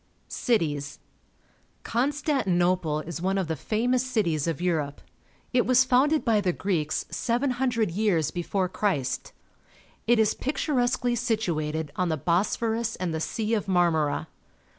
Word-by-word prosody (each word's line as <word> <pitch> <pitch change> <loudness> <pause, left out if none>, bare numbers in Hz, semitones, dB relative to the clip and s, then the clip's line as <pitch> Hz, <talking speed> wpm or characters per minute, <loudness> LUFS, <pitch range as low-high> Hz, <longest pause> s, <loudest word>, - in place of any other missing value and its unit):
Cities. 145 - -1 0.4
— - - -38
Constantinople 185 - +1
is 170 +1 -6
one 190 +2 0
of 190 -3 -1
the 160 - -1
famous 240 - 0
cities 175 - 0
of 165 -2 -1
Europe. 160 -5 -1 0.5
It 245 -1 +3
was 255 0 +5
founded 270 +5 +3
by 220 -3 +3
the 185 -2 +1
Greeks 170 -5 -1
700 245 -4 0
years 180 -5 +1
before 185 +2 -1
Christ. 145 -11 -1 0.8
It 240 +1 +5
is 220 -1 +3
picturesquely 250 -3 0
situated 165 - -1
on 180 0 0
the 160 - 0
Bosphorus 220 - 0
and 180 -3 -3
the 160 - -2
Sea 220 +6 -2
of 210 -2 0
Marmora. 170 -5 +1
195 Hz, 135 wpm, -26 LUFS, 165-240 Hz, 0.8 s, was